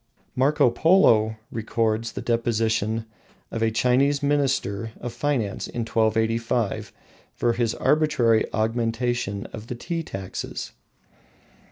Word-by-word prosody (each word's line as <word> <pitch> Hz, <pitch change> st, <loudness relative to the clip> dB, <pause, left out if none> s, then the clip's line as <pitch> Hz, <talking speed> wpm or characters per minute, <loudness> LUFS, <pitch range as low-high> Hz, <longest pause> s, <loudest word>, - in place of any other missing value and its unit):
Marco 140 Hz, 0 st, +3 dB
Polo 115 Hz, -, +4 dB, 0.2 s
records 110 Hz, 0 st, -1 dB
the -, -, -5 dB
deposition 115 Hz, -1 st, 0 dB, 0.5 s
of 115 Hz, -, -3 dB
a 115 Hz, -, +3 dB
Chinese 130 Hz, +5 st, +2 dB
minister 130 Hz, -7 st, 0 dB
of 120 Hz, -, -5 dB
finance 130 Hz, -9 st, -1 dB
in 120 Hz, -, -4 dB
1285 115 Hz, 0 st, 0 dB, 0.4 s
for 120 Hz, -1 st, +1 dB
his 115 Hz, -2 st, 0 dB
arbitrary 150 Hz, -8 st, +3 dB
augmentation 115 Hz, -2 st, -1 dB
of 110 Hz, 0 st, -8 dB
the 125 Hz, -, -4 dB
tea 165 Hz, +7 st, -3 dB
taxes. 95 Hz, -, -6 dB
115 Hz, 110 wpm, -24 LUFS, 110-130 Hz, 0.5 s, Polo